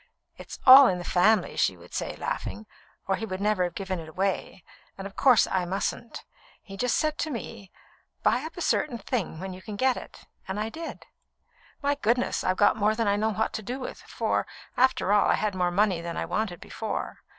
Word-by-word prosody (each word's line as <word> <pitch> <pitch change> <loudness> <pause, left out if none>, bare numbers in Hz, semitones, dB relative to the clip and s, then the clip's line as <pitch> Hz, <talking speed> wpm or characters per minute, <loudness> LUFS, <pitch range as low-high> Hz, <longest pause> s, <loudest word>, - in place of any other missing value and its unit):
"It's - - -10
all 265 +1 +11
in 180 - +1
the 175 - -6
family," 210 +6 +2
she - - +1
would - - -16
say, - - -3
laughing, 220 - -4 0.4
"or 190 - +1
he 225 - -4
would 185 -2 -4
never 205 -3 +1
have 175 - -5
given 190 -2 -3
it 160 -1 -9
away; 190 +1 -2 0.3
and, 195 - -7
of 200 - -8
course, 255 -4 +5
I 185 -1 -1
mustn't. 200 +5 -4 0.3
He 195 - -11
just 245 +4 0
said 310 -1 0
to 315 - -1
me: 230 -6 -7 0.5
'Buy 245 - +3
up 320 +2 -8
a - - -5
certain 255 -6 0
thing 200 -6 -3
while 190 +1 -5
you 185 - -10
can 210 +1 -7
get 260 +4 +2
it,' - - -11 0.2
and 190 +2 -3
I 215 +1 -2
did. 325 +7 -8 0.8
My 285 0 +2
goodness! 245 -2 0
I've 185 0 0
got 205 - +4
more 215 +1 +2
than 225 -1 0
I 200 - +3
know 215 +2 +1
what 220 +2 -1
to 220 - -3
do 245 +6 -5
with, 255 - -7
for, - - -2 0.3
after 255 -5 +3
all, 210 - +4
I - - +4
had 210 -2 -1
more 180 -1 +1
money 185 -1 +1
than 170 0 -5
I - - -2
wanted 215 -5 -2
before. 220 - -5
210 Hz, 215 wpm, -27 LUFS, 190-240 Hz, 0.8 s, all